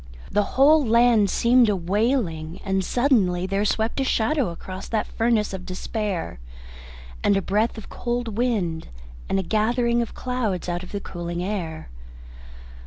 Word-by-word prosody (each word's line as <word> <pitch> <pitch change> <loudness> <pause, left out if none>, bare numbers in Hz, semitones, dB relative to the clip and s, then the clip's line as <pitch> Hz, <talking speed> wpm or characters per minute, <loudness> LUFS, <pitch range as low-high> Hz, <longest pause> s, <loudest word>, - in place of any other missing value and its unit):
The 210 - +3 0.2
whole 295 +3 +6
land 230 -3 +4
seemed 235 +2 +4
a 205 - +2
wailing, 185 - -1
and 190 -1 0
suddenly 195 -7 +2
there 195 +2 0
swept 220 +4 0
a - - +2
shadow 260 - +1
across 185 +3 -8
that 220 -2 -1
furnace 225 -3 0
of 190 -1 -5
despair, 185 - -4 0.8
and 200 - +4
a - - +3
breath 215 +5 0
of 220 - -9
cold 240 -3 -3
wind, 205 -9 -1 0.4
and 195 - +1
a 190 - 0
gathering 235 +4 +1
of 235 - -5
clouds, 235 -9 -2
out 175 0 -2
of 185 - -11
the 200 - -4
cooling 175 -1 -5
air. 175 - -4
210 Hz, 155 wpm, -24 LUFS, 185-235 Hz, 0.8 s, whole